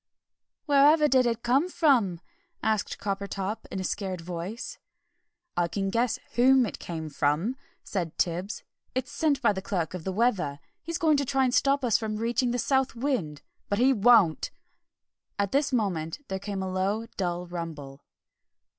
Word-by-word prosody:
"Wherever 300 +1 +5
did 255 -3 +4
it 235 -1 -2
come 270 +9 +2
from?" 235 - +2 0.4
asked 215 -2 0
Coppertop 200 +1 -3
in 190 - -4
a - - -3
scared 185 -1 -3
voice. 175 +7 -6 0.8
"I 175 - +2
can 195 +2 -2
guess 235 +2 +1 0.2
whom 255 +1 +5
it 210 - -6
came 160 -2 -5
from," 150 - 0 0.3
said 175 -5 -3
Tibbs; 180 +4 -1 0.3
"it's 255 +2 -2
sent 285 -1 0
by 220 - +4
the 190 - -4
Clerk 185 -5 -2
of 180 -3 -6
the 190 - -2
Weather. 185 -10 0 0.2
He's 335 +1 -3
going 310 -3 +3
to 280 - 0
try 270 +1 +1
and 250 -1 +1
stop 280 -1 +3
us 230 0 +2
reaching 230 +3 0
the 245 - 0
South 265 +1 +1
Wind. 230 - -2 0.3
But 200 - +1
he 260 +4 +4
won't!" 215 -7 +4 0.9
At 200 -1 0
this 280 +1 +2
moment 195 - -1
there 190 0 -2
came 200 -1 -4
a 190 - -3
low, 195 +4 0
dull 175 -2 -2
rumble. 160 -6 -7
210 Hz, 165 wpm, -27 LUFS, 180-255 Hz, 0.9 s, Wherever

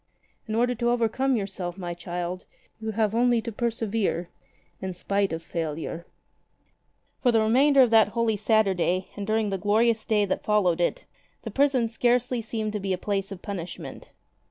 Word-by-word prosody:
In 215 - -2
order 245 +2 +2
to 240 0 0
overcome 245 +3 +1
yourself, 195 -4 -4
my 175 -2 -4
child, 175 +1 -5 0.3
you 220 0 -4
have 215 -1 +1
only 240 0 +3
to 230 - -4
persevere 220 -6 -1 0.3
— - - -38
in 190 -1 -4
spite 200 +2 0
of 165 0 -4
failure'' 165 +1 -4 1.1
For 245 - +4
the 225 - +3
remainder 265 +5 +5
of 240 - +1
that 220 -2 +6
Holy 225 0 0
Saturday 195 -4 +1
and 205 -1 -5
during 215 -1 +1
the 195 - -2
glorious 220 +3 +2
Day 210 -2 +2
that 190 - -2
followed 185 -5 +2
it, 175 - 0 0.5
prison 270 -4 +3
scarcely 245 +1 +1
seemed 220 -1 -3
to 210 - -2
be 195 -1 -1
a - - -1
place 195 +1 -2
of 190 -2 -8
punishment. 185 -5 -7
215 Hz, 170 wpm, -26 LUFS, 185-230 Hz, 1.1 s, that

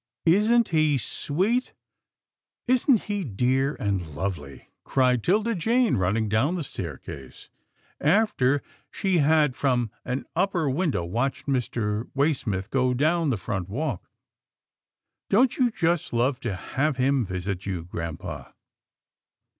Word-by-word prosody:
"Isn't 215 +7 +4
he 155 -3 +3
sweet 195 - -1 0.5
— - - -58
isn't 255 -2 +3
he 205 -2 -2
dear 130 - 0
and 100 -3 -1
lovely?" 75 -5 -5 0.2
cried 125 -2 +2
'Tilda 215 +5 +2
Jane, 230 +5 +2
running 100 +4 +1
down 115 - +1
the 170 - -2
staircase 70 - -8 0.5
after 145 - +2 0.3
she 190 -3 0
had 150 -2 +3
from 125 -5 0
an 130 +1 -3
upper 180 -3 +1
window 140 - 0
watched 120 +9 -2
Mr. 115 -5 -1
Way 145 +3 +3
smith 100 -7 -4
going 125 -2 +1
down 160 +3 +2
the 125 - 0
front 95 -3 -4
walk. 130 - -3 0.6
" - - -63
Don't 240 +5 +3
you 250 -2 +4
just 170 - 0
love 125 +2 +1
to 115 -7 -3
have 140 +8 -1
him 135 0 +2
visit 95 0 -4
you, 90 -4 -3
grampa? 85 -2 -6
135 Hz, 130 wpm, -25 LUFS, 105-170 Hz, 0.6 s, Isn't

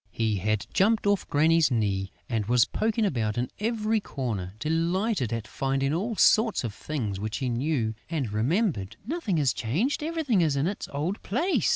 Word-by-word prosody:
He 110 -2 0
had 105 +2 0
jumped 215 +2 +3
off 205 -2 +1
Granny's 160 +2 +4
knees 100 -5 0 0.2
and 110 -3 -1
was 120 -1 +5
poking 220 0 0
about 115 - -1
in 125 +1 -1
every 220 0 0
corner, 110 - -4
delighted 165 - 0
at 115 -2 -3
finding 135 +1 -1
all 210 +8 -1
sorts 220 - +4
of 115 -4 -3
things 110 -6 -4
which 105 +1 -3
he 130 - -2
knew 120 -2 0 0.2
and 145 -10 -2
remembered: 115 - 0
"Nothing 250 - -1
is 140 -4 +2
changed, 170 - -1
everything 300 - +1
is 155 -4 +2
in 140 +2 +1
its 195 +3 -3
old 155 +8 -2
place!" 315 - +1
145 Hz, 175 wpm, -27 LUFS, -, 0.2 s, was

